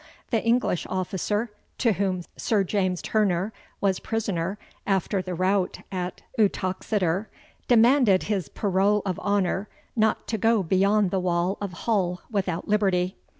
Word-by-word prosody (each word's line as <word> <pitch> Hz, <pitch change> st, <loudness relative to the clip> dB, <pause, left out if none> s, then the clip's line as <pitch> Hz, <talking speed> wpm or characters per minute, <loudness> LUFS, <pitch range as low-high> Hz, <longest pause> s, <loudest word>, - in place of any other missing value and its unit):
The 225 Hz, -3 st, +2 dB
English 230 Hz, -6 st, +1 dB
officer, 200 Hz, +4 st, -1 dB, 0.3 s
to 235 Hz, -, +3 dB
whom 185 Hz, -2 st, -1 dB
Sir 210 Hz, -3 st, +1 dB
James 185 Hz, -2 st, -1 dB
Turner 205 Hz, -1 st, +1 dB, 0.3 s
was 195 Hz, -2 st, +1 dB
prisoner 200 Hz, -4 st, -2 dB, 0.3 s
after 195 Hz, 0 st, +1 dB
the 185 Hz, -1 st, -5 dB
rout 185 Hz, +1 st, +1 dB
at 180 Hz, -1 st, -4 dB, 0.2 s
Uttoxeter, 190 Hz, -1 st, 0 dB, 0.4 s
demanded 235 Hz, -4 st, +5 dB
his 195 Hz, -9 st, -2 dB
parole 200 Hz, +1 st, +1 dB
of 185 Hz, -3 st, -2 dB
honour 200 Hz, 0 st, 0 dB, 0.3 s
not 220 Hz, -1 st, +1 dB
to 220 Hz, -, -1 dB
go 225 Hz, -1 st, +3 dB
beyond 195 Hz, +2 st, +2 dB
the 190 Hz, -, +1 dB
wall 180 Hz, +1 st, 0 dB
of 200 Hz, -3 st, -4 dB
Hull 180 Hz, -6 st, 0 dB
without 185 Hz, -5 st, -2 dB
liberty. 190 Hz, -3 st, +1 dB
195 Hz, 135 wpm, -25 LUFS, 185-210 Hz, 0.4 s, demanded